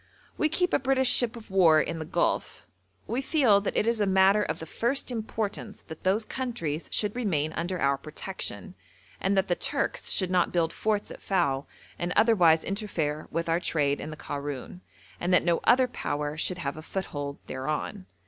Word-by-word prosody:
We 310 - +1
keep 360 +3 0
a - - +4
British 265 -1 +3
ship 245 -1 +3
of 220 -3 -12
war 170 -5 +6
in 165 +1 -2
the 160 - -4
Gulf. - - -1 0.4
We 240 +4 -2
feel 260 -9 +4
that 200 - -2
it - - +2
is 230 -1 +1
a 205 - +2
matter 190 +2 +5
of - - -2
the 160 - -7
first 240 - 0
importance 220 -2 -4
that 160 -1 -11
those 200 +4 +1
countries 225 - -4
should 210 0 +1
remain 160 -11 -1
under 175 +2 -3
our 140 0 +2
protection, 150 - -5 0.5
and 195 +1 +1
that 190 +1 +2
the 175 - +2
Turks - - -1
should 185 -2 0
not 180 -2 +2
build 165 -2 +1
forts 215 -1 -1
at - - -10
Fao 140 -8 0 0.3
and 175 +1 -2
otherwise 175 -8 +5
interfere 170 -7 -2
with 165 +1 -2
our 165 +1 +2
trade 145 -5 0
in - - -6
the 155 - -8
Karoun, 145 +5 -6 0.4
and 175 - -1
that - - +3
no 170 -1 +2
other 255 0 +5
power 150 -11 -3
should 180 +3 -1
have 140 -4 -4
a - - -6
foothold 145 -5 -5
thereon. 155 +8 -4
185 Hz, 190 wpm, -27 LUFS, 155-215 Hz, 0.5 s, war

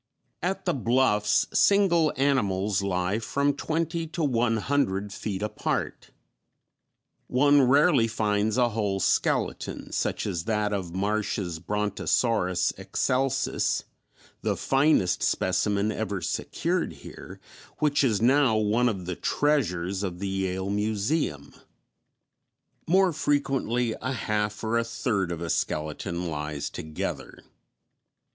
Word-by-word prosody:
_ 180 - +2
At 195 - -5
the 175 - +1
bluffs 115 -4 +2
single 175 -6 +4
animals 105 -8 +1
lie 95 +1 -1
from 140 +5 0
twenty 165 +3 -2
to 165 +1 -3
one 120 -4 +1
hundred 105 -6 0
feet 100 -1 -4
apart; 105 0 -3 1.2
one 145 +3 +4
rarely 135 -1 +4
finds 105 -1 0
a 120 -1 +3
whole 105 -3 -1
skeleton, - - -1
such - - -1
as 85 -2 -3
that 105 -2 0
of 90 -3 -4
Marsh's 100 -4 -1
Brontosaurus 105 0 0
excelsus, 135 +1 0 0.6
the - - -1
finest 135 - +2
specimen 100 +3 +1
ever 105 -2 -3
secured 85 - -2
here, - - -11 0.4
which 145 -1 +2
is 110 -7 +2
now 130 -1 +4
one 110 +3 +2
of 95 -5 -4
the 90 0 -3
treasures 95 - 0
of 90 -4 -3
the 100 +2 -4
Yale 95 0 -2
museum. 105 - -1 1.3
More 185 0 +4
frequently 135 -6 0
a 130 +3 -2
half 105 -3 -2
or 115 +1 +1
a - - 0
third 110 -5 -1
of 85 -1 -5
a 85 - -4
skeleton 80 +3 -2
lies 75 -2 -4
together. 80 -1 -6
105 Hz, 120 wpm, -26 LUFS, 95-135 Hz, 1.3 s, single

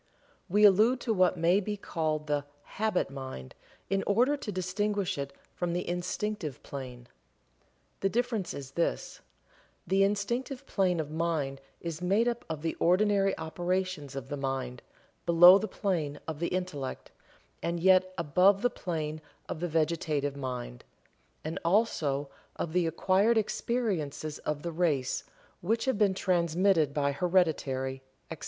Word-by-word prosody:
We 205 +4 +3
allude 215 +6 +5
to 230 - 0
what 185 -2 +3
may 170 +4 +4
be 210 +1 -3
called 155 -5 -2
the 145 -1 -1 0.3
"Habit 215 -9 +1
Mind," 130 - -7 0.3
in 195 +1 +1
order 245 +8 +3
to 260 -7 -5
distinguish 195 +1 -1
it 140 -2 -4 0.2
from 175 -1 -2
the 175 - -2
Instinctive 180 - -3
Plane. 125 -3 -8 0.9
The 195 - +1
difference 230 -3 -1
is 135 -2 -7
this: 170 +4 -2 0.6
The 190 +3 +2
Instinctive 235 +7 -1
plane 185 -7 +1
of 150 -1 -3
mind 155 -4 -1 0.2
is 165 -1 -5
made 200 +6 +2
up 240 0 -2
of 155 -1 -4
the 165 - 0
ordinary 195 +2 +3
operations 175 -3 -2
of 135 -1 -6
the 145 - -3
mind 135 -2 -3 0.5
below 175 +3 +9
the 215 - -3
plane 165 -10 -2
of 160 -2 -4
the 170 - 0
Intellect, 180 -8 -4 0.5
and 170 0 -1
yet 185 +1 +5
above 185 +6 +3
the 245 - +3
plane 155 -6 -4 0.3
of - - -5
the 175 - -1
Vegetative 155 -3 0
mind 125 - -5 0.6
and 155 +1 -4
also 165 -7 +1 0.3
of 160 - -4
the 180 -2 +2
acquired 190 +7 +2
experiences 190 - -1
of 150 -1 -3
the 170 - -3
race, 155 -6 0 0.4
which 225 +8 0
have 260 -6 0
been 200 -3 +3
transmitted 175 -3 +2
by 140 -1 +1
heredity, 140 -6 0 0.3
etc. - - -6
175 Hz, 145 wpm, -29 LUFS, 150-195 Hz, 0.9 s, below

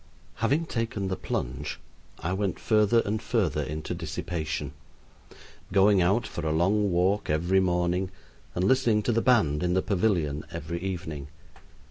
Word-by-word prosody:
Having 140 +9 +1
taken 115 -7 -2
the 95 - -1
plunge, 60 -7 -4 0.4
I 85 +3 -2
went 95 -1 -1
further 110 +1 +3
and 110 +1 -1
further 95 -10 0
into 75 +2 -4
dissipation, 75 -4 -4 1.0
going 100 0 +5
out 100 +7 +2
for 85 - -5
a 80 - 0
long 100 +5 +2
walk 95 +4 +1
every 85 +5 +2
morning 90 0 +1 0.5
and 90 - 0
listening 115 -1 +3
to 120 - +1
the 115 0 +2
band 105 - +3
in 90 0 +1
the 95 - +2
pavilion 90 -8 0
every 85 +3 -4
evening. 85 -7 -4
95 Hz, 145 wpm, -27 LUFS, 80-105 Hz, 1.0 s, going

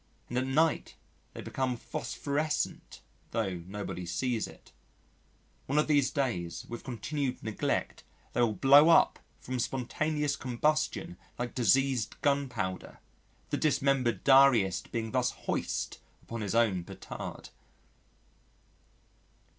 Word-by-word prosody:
And 120 - -3
at 130 - -2
night 155 +4 +1 0.4
they - - -6
become 130 -2 -2
phosphorescent, 140 +8 -3 0.3
though 105 -6 -1
nobody 95 -3 -5
sees 120 +5 -1
it. - - -16 1.0
One 140 - 0
of 150 - +4
these 145 -3 +3
days, 95 - -2
with 120 - -7
continued 135 +2 -3
neglect 110 -2 -2 0.3
they 120 - +1
will 115 -3 +3
blow 140 - +7
up 165 - +5 0.2
from 130 0 -4
spontaneous 145 +4 -1
combustion 155 +7 -1 0.2
like 120 -1 -3
diseased 125 0 +2
gunpowder, 125 -10 -1 0.5
the - - +1
dismembered 135 -5 +1
diarist 130 -9 +5
being 115 -2 -3
thus 125 -1 +2 0.2
hoist - - -2 0.2
upon 115 -1 -6
his 105 +1 -2
own 105 -7 +3
petard. - - -8
125 Hz, 115 wpm, -30 LUFS, 115-140 Hz, 1.0 s, blow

